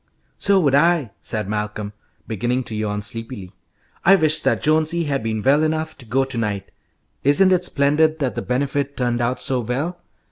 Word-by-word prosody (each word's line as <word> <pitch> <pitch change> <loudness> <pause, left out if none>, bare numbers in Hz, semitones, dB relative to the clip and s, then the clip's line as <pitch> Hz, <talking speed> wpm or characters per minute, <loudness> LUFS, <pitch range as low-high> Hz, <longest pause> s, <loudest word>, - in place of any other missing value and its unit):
"So 200 -1 +3
would 140 -5 +2
I," 150 - +3
said 110 -3 -3
Malcolm, 105 0 -4 0.3
beginning 120 +4 -1
to 110 - -5
yawn 105 -1 -2
sleepily. 115 -3 -6 0.5
"I 195 +3 +7
wish 155 -4 +3
that - - 0
Jonesy 160 +2 +2
had 140 -3 -1
been 110 -1 -3
well 140 +3 +4
enough 155 0 -1
to 125 - -9
go 135 +4 +1
to 130 -3 -3
night. 100 -3 -3 0.5
Isn't 185 +8 +4
it 180 0 +1
splendid 155 +1 +2
that 135 -5 -1
the - - -3
Benefit 140 +2 -2
turned 120 -1 0
out 120 +2 -1
so 130 -1 +1
well? 140 +10 -3
135 Hz, 180 wpm, -21 LUFS, 115-155 Hz, 0.5 s, I